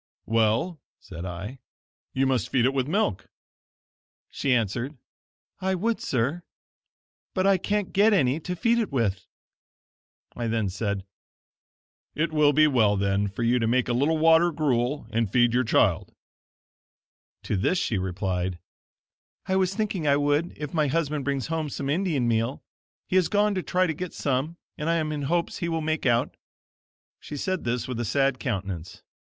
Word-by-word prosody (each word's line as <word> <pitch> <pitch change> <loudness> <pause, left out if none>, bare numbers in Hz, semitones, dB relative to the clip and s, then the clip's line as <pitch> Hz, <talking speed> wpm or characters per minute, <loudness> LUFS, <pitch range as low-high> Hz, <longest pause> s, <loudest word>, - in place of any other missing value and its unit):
"Well," 115 - +1 0.2
said 90 -4 -8
I, 95 +9 -6 0.5
"you 135 +1 +1
must 130 -5 0
feed 125 -3 +2
it 135 - +2
with 135 -1 0
milk." 170 - -1 1.0
She 140 - -1
answered: 120 +4 0 0.6
"I 190 0 0
would, 225 +5 -1
sir, 135 +7 -1 0.9
but 185 -1 +1
I 195 -1 +4
can't 205 +1 -1
get 210 +3 +5
any 145 -7 +2
to 180 +3 -4
feed 235 +6 +2
it 220 -8 -1
with." 105 -8 -1 1.1
I 120 -1 -3
then 110 -3 0
said: 100 0 -3 1.1
"It 160 +1 -1
will 150 -1 +5
be 155 +2 +5
well, 115 -8 +3
then, 100 +1 +1
for 100 +4 -4
you 120 +2 +3
to 115 - 0
make 125 +2 +2
a 120 - 0
little 145 +6 +2
water 165 +2 +5
gruel, 145 -2 0
and 115 -2 0
feed 120 -1 +3
your 125 +1 +3
child." 95 -5 +1 1.3
To - - -1
this 100 - +1
she 110 - 0
replied: 90 -1 -2 0.9
"I 190 - 0
was 190 0 +1
thinking 200 -7 -1
I 140 0 +4
would 145 +3 0
if 150 -2 -6
my 155 -3 +2
husband 150 -1 -1
brings 140 -2 -1
home 160 -2 -2
some 140 0 -3
Indian 155 -7 0
meal. 115 +3 0 0.4
He 185 - +1
has 185 - +3
gone 210 0 +2
to 185 - -1
try 185 +1 +1
to 160 - -1
get 180 +3 -6
some 140 +5 -1 0.2
and 150 +2 -1
I 170 - +3
am 155 -2 -1
in 150 -1 -3
hopes 170 0 0
he 170 - -2
will 165 -1 -1
make 155 -2 -1
out." 120 -1 +1 0.8
She 150 - -8
said 185 +2 -2
this 120 0 -1
with 125 -2 -4
a - - 0
sad 135 +2 +1
countenance. 95 - -4
140 Hz, 170 wpm, -26 LUFS, 115-165 Hz, 1.3 s, get